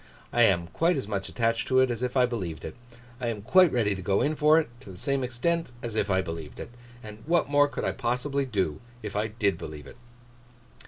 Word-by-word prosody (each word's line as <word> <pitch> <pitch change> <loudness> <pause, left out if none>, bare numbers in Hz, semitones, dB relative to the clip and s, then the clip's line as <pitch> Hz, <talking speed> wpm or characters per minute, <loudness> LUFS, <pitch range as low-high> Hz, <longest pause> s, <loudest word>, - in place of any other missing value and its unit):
I 120 - +3
am 85 -5 +2
quite 165 - +1
as 130 - -4
much 100 -2 -3
attached 115 -1 0
to 130 -1 +4
it 130 -1 +4
as 120 -1 -4
if 125 +1 -1
I 125 - +6
believed 95 -10 -4
it. - - -6 0.5
I 125 - -2
am 110 -3 -3
quite 180 - +5
ready 110 -5 +1
to 95 - -6
go 95 +2 +1
in 155 +2 +1
for 150 +2 +5
it, 160 - -2
to 125 - -13
the 90 - -11
same 140 +3 -1
extent 145 +6 -1
as 115 -2 -4
if 105 -2 0
I 95 -1 +2
believed 80 -2 -7
it. - - -7 0.3
And 105 0 -9
what 170 -4 +2
more 145 0 +5
could - - -5
I - - +1
possibly 135 +3 -1
do, 95 - -1 0.2
if 105 -1 -6
I 105 +1 +1
did 100 -5 0
believe 75 -2 -8
it! - - -13
115 Hz, 235 wpm, -27 LUFS, 100-135 Hz, 0.5 s, I